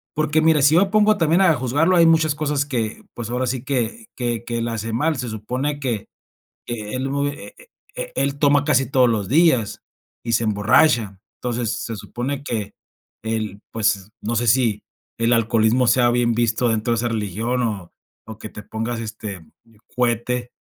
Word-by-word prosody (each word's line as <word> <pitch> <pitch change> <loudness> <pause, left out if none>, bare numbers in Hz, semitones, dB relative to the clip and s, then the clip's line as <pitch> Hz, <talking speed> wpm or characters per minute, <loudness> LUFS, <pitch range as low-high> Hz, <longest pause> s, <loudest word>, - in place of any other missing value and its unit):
porque 155 0 +1
mira, 160 -2 +4
si 145 +3 +5
yo 195 +3 +4
pongo 215 0 +4
también 165 +1 +3
a 190 -4 +5
juzgarlo, 145 +8 +1
hay 170 - +6
muchas 160 -2 +3
cosas 145 -2 -1
que, 115 -6 -3
pues, 115 -2 -6
ahora 125 +1 -1
sí 125 0 -2
que 140 - -2
que 120 -2 -2
que 120 -1 -2
él 115 - -2
hace 115 0 -4
mal, 150 +6 0
se 125 -1 -4
supone 125 +7 -3
que 120 -7 -3 0.6
que 110 -2 -5
él 130 +1 -2
bu 140 +1 0
eh 145 - -8 0.4
eh - - -5
él 140 0 0
toma 145 -1 +3
casi 135 -3 +2
todos 130 -2 +4
los 105 -4 -1
días 135 - +2 0.4
y 115 - -2
se 115 0 +2
emborracha. 105 0 +2 0.2
Entonces, 120 -2 -2
se 115 - -5
supone 130 +7 -4
que 105 -6 -4 0.5
el 110 -2 -3
pues, 105 -3 0
no 115 +2 -2
sé, 120 +2 0
si 110 -3 +2 0.3
el 115 +1 +2
alcoholismo 115 +2 +2
sea 120 0 +4
bien 120 -1 +2
visto 120 +1 +1
dentro 115 +1 0
de - - +1
esa 120 +1 0
religión, 115 +3 -2
o 100 -7 -3 0.3
o 110 -1 -9
que 110 - -8
te 105 - -9
pongas, 115 +2 -4
este, 105 -6 -7 0.5
cuete 120 0 -1
120 Hz, 185 wpm, -21 LUFS, 110-140 Hz, 0.6 s, hay